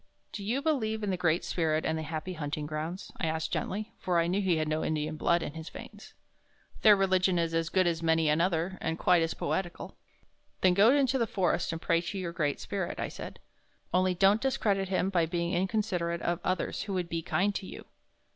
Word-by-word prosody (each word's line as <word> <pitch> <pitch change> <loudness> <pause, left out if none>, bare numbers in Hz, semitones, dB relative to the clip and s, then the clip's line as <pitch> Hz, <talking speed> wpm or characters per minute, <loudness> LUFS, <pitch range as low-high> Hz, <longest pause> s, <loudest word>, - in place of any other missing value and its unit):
"Do 205 - -6
you 245 +7 -1
believe 220 -9 0
in 205 - 0
the - - +1
Great 175 -1 +1
Spirit 160 -2 0
and 160 - 0
the 160 - -3
Happy 160 +3 -4
Hunting 150 -2 -4
Grounds?" 155 +4 -5
I 165 - -1
asked 160 0 -2
gently, 215 +3 -3
for 180 -2 0
I 165 - +3
knew 185 +4 0
he 185 -4 +2
had 155 -1 0
no 155 +1 -1
Indian 155 0 -1
blood 170 +2 +2
in - - -5
his 160 0 -7
veins. - - -11 0.7
"Their 210 -1 +8
religion 185 -2 +2
is 165 -1 0
as 165 0 0
good 185 +1 +2
as 170 -1 0
many 160 -1 +2
another, 170 +3 +1
and 160 0 -2
quite 175 -1 +4
as 165 0 -1
poetical." 175 -2 -3 0.7
"Then 185 -1 +5
go 200 +5 +6
into 270 -1 +3
the 230 - +1
forest 190 -4 0
and 165 - -4
pray 165 0 +1
to 175 +3 -5
your 175 -3 -4
Great 145 -4 -1
Spirit," 190 -4 -4
I - - -2
said. - - -8 0.6
"Only 185 0 +3
don't 195 +4 +4
discredit 200 -7 0
him 190 0 0
by 170 -3 +2
being 170 +1 -1
inconsiderate 180 -3 -1
of 175 0 0
others 185 0 -1
who 205 -2 -4
would 180 -2 -1
be 165 -1 -3
kind 190 +6 0
to 195 - -5
you." - - -9
175 Hz, 215 wpm, -30 LUFS, 165-195 Hz, 0.7 s, Their